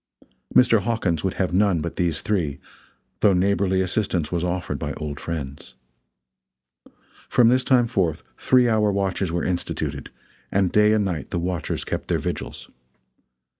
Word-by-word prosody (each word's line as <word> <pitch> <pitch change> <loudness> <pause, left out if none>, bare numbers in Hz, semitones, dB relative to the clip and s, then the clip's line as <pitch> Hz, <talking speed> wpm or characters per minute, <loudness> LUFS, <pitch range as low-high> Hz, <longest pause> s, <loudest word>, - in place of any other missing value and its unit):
Mr. 115 -4 +5
Hawkins 95 -7 -1
would 95 - -1
have 95 -2 -1
none 95 -2 +3
but 85 +2 -4
these 85 -3 0
three, 85 -10 -1 0.6
though 100 - +4
neighborly 95 0 +2
assistance 90 -4 -1
was 85 -1 -1
offered 90 -3 -2
by - - -3
old 75 -2 -6
friends. 70 -6 -6 1.5
From 120 -2 +5
this 130 +1 +3
time 125 -2 +4
forth 95 -9 -1
three 125 -1 +3
hour 110 -2 +2
watches 95 -2 -1
were 85 0 -1
instituted, 90 -1 -3 0.4
and 95 -2 +1
day 105 0 +4
and 105 -2 +2
night 85 -7 -3
the - - -2
watchers 85 0 -3
kept - - -4
their - - +1
vigils. - - -5
95 Hz, 150 wpm, -23 LUFS, 85-105 Hz, 1.5 s, Mr